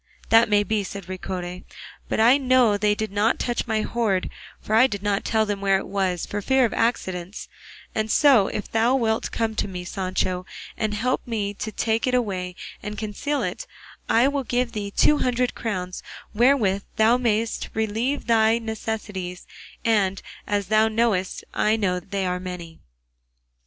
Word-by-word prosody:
"That 225 0 +6
may 205 0 +4
be," 210 0 -1
said 195 -1 -7
Ricote; 180 -1 -5 0.5
"but - - -1
I 240 +5 +6
know 255 -5 +4
they 210 0 +2
did 215 -1 -3
not 205 +3 +2
touch 240 -1 -2
my 220 -1 +1
hoard, 215 -6 0 0.3
for 215 - -5
I 240 +4 +7
did 200 -5 -5
not 205 -1 0
tell 220 -1 +1
them 205 -1 -3
where 195 -1 +3
it - - -5
was, 190 -3 -1
for 205 - -4
fear 265 +4 +3
of 230 - -2
accidents; 190 -5 -2 0.5
and 220 0 -1
so, 255 -7 +5
if 210 - -5
thou 230 +3 +3
wilt 225 -3 0
come 225 -1 -1
with 215 - -2
me, 180 -1 -6
Sancho, 185 0 -2 0.3
and 215 -1 -2
help 250 +4 -1
me 210 -4 -2
to 215 +2 -5
take 225 +3 0
it 250 - +2
away 185 -7 -2 0.3
and 210 0 -6
conceal 220 +8 -2
it, - - -4 0.4
I 235 +3 +5
will 280 -1 -1
give 245 0 -1
thee 205 -3 -4
two 295 +8 +3
hundred 250 0 0
crowns 185 -5 -4 0.3
wherewith 220 -4 +3
thou 225 +3 +4
mayest 230 -2 -1
relieve 220 +6 -1
thy 225 -1 +4
necessities, 215 -5 -5 0.4
and, 200 -4 +2 0.3
as 205 -2 -1
thou 215 0 +4
knowest, 220 -4 0
I 215 +1 +2
know 185 -5 0
they 190 +2 -3
are 180 0 -1
many." 180 -3 -8
215 Hz, 170 wpm, -24 LUFS, 195-230 Hz, 0.5 s, I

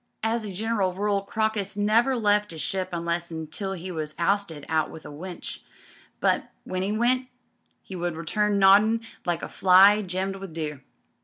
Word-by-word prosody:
As 225 +1 0
a 205 - -5
general 200 -2 -1
rule 200 0 0
Crocus 210 0 -2
never 225 +6 +3
left 210 -3 +2
'is 160 - -8
ship 190 +3 -2
unless 170 0 -2
an' 165 - -5
until 160 +5 -4
he 185 0 -6
was 155 -2 -5
'oisted 170 -4 0
out 160 -1 +1
with 160 - -11
a - - -8
winch, 175 +4 -7 0.6
but - - +1
when 185 0 -3
'e 195 +2 -1
went 255 +2 +2 0.6
'e 190 - -7
would 175 -2 -2
return 205 +6 0
noddin' 205 +4 +5 0.3
like 170 -1 -1
a - - -6
lily 195 +3 +7
gemmed 190 0 -3
with 190 -4 -9
dew. 150 -3 -4
195 Hz, 175 wpm, -26 LUFS, 170-210 Hz, 0.6 s, lily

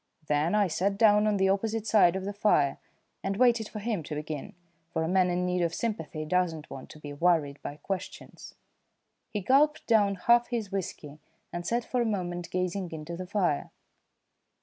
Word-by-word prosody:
Then 150 +5 +1
I 205 -2 +3
sat 195 +4 0
down 210 -1 +5
on 210 -1 +2
the 190 0 +3
opposite 215 +2 0
side 200 -5 +5
of 190 0 -3
the 200 - -3
fire 175 -9 +2 0.4
and 195 0 -2
waited 235 -3 +3
for - - -8
him 210 -3 -2
to 150 - -5
begin, 150 -1 -6 0.3
for 160 - -1
a - - -1
man 185 +1 +3
in 180 +1 0
need 180 0 0
of 170 0 0
sympathy 160 -9 -3
does 180 0 +1
not 155 -1 -11
want 135 - -8
to 155 - -12
be 145 -1 -8
worried 150 -3 +1
by 145 - -6
questions. 185 +4 -7 0.7
He 210 - -3
gulped 285 +8 +3
down 205 -4 +3
half 235 +5 +4
his 225 -5 -3
whisky 155 -6 -5 0.3
and 175 0 -4
sat 235 +2 0
for 250 - 0
a - - +1
moment 175 -5 -3
gazing 185 0 -2
into 160 +1 -6
the 185 +1 -6
fire. 180 -7 0
185 Hz, 195 wpm, -28 LUFS, 165-210 Hz, 0.7 s, down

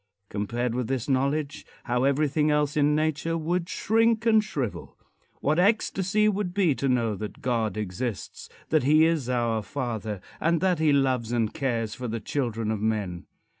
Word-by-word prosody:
Compared 115 +4 -2
with 125 -1 -2
this 130 -3 -2
knowledge, 140 +2 0 0.2
how 125 +2 0
everything 150 +2 +2
else 150 -1 +1
in 150 0 +3
nature 155 +2 0
would 170 +2 -1
shrink 225 +1 +2
and 220 -2 +5
shrivel! 140 - -5 0.4
What 155 +4 +1
ecstasy 205 0 +2
it - - +5
would 195 -2 -3
be 185 -7 +3
to 135 +1 -1
know 120 -4 +1
that 105 +1 -7
God 115 -5 0
exists; 105 +2 -5 0.2
that 155 -1 +3
he 155 +4 +5
is 160 -7 0
our 120 -3 0
father 110 -2 -4 0.2
and 165 0 +2
that 180 -1 +1
he 155 -1 +3
loves 130 -5 +1
and 115 -3 0
cares 115 -5 -1
for 125 - -5
the 115 0 -3
children 115 -2 -2
of 110 -2 -2
men! 105 -6 -2
135 Hz, 170 wpm, -26 LUFS, 115-160 Hz, 0.4 s, and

